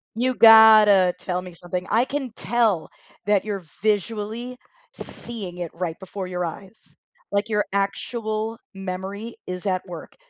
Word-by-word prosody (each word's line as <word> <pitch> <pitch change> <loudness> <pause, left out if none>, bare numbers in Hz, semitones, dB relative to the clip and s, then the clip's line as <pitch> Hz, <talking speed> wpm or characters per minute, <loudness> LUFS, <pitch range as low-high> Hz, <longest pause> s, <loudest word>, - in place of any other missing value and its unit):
You've 250 +2 0
gotta 215 -5 +8
tell 180 -1 -3
me 180 - -10
something. 180 +1 -5
I 230 +3 +3
can 265 -3 -4
tell 225 -9 0 0.4
that 205 -2 +2
you're 205 -3 -4 0.2
visually 220 +3 -2 0.4
seeing 200 - -5
it 175 -2 -4
right 170 -2 -4
before 190 0 -6
your 180 -1 -3
eyes. 195 +5 -9 0.4
Like, 200 +2 0
your 210 -1 0
actual 220 +2 -2 0.2
memory 195 +4 -6
is 180 +2 -5
at 185 -1 -1
work. 175 -3 -10
205 Hz, 140 wpm, -23 LUFS, 185-225 Hz, 0.4 s, gotta